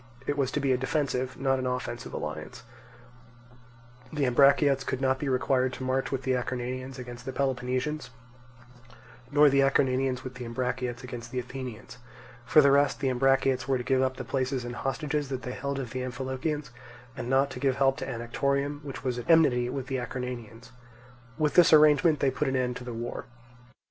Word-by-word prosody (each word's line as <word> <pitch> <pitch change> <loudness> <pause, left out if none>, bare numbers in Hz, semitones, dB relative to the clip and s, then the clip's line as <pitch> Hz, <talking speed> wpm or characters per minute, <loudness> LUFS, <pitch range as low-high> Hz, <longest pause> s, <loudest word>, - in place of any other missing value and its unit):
It 145 - -1
was 140 -3 0
to - - 0
be 140 -2 +1
a 125 - +2
defensive, 130 -2 -1
not 135 -1 +1
an 130 - -2
offensive 125 -1 -4
alliance; 75 0 -6 1.5
the 150 -2 0
Ambraciots 140 +2 +4
could 130 - -3
not 130 0 +1
be 145 - -2
required 130 0 +1
to 130 - -6
march 130 +1 -1
with 135 -1 -2
the 130 - +1
Acarnanians 130 +1 -3
against 120 -1 -8
the 130 - -4
Peloponnesians, 130 +1 -2 1.2
nor 145 +1 +6
the 140 -1 +4
Acarnanians 130 -1 +1
with 130 - -7
the 130 -1 -8
Ambraciots 125 +1 -3
against 120 -2 -7
the 130 - -6
Athenians; 125 -1 -6 0.5
for 155 - +7
the 140 -1 +5
rest 140 0 +3
the 135 - 0
Ambraciots 135 0 +2
were 135 -1 +2
to 125 - -4
give 130 +1 +2
up 130 -1 0
the 130 - -4
places 130 -1 -2
and 120 0 -5
hostages 145 +1 -2
that 130 -1 -4
they 125 - -4
held 140 +2 -3
of 130 -4 -5
the 130 - -3
Amphilochians, 130 +3 -3 0.4
and 120 - -5
not 135 +1 +3
to - - -7
give 135 -2 +1
help 135 0 +2
to - - -5
Anactorium, 140 +5 -2
which 140 -1 -7
was 125 -2 -1
at 120 - -9
enmity 130 -7 +4
with 135 0 -4
the 135 0 -2
Acarnanians. 120 -2 -6 0.7
With 150 -1 +1
this 175 - +6
arrangement 155 0 +5
they 135 - +3
put 150 - -1
an 135 - 0
end 125 -1 0
to - - -9
the 125 - -6
war. 120 +1 -5
130 Hz, 190 wpm, -28 LUFS, 125-140 Hz, 1.5 s, for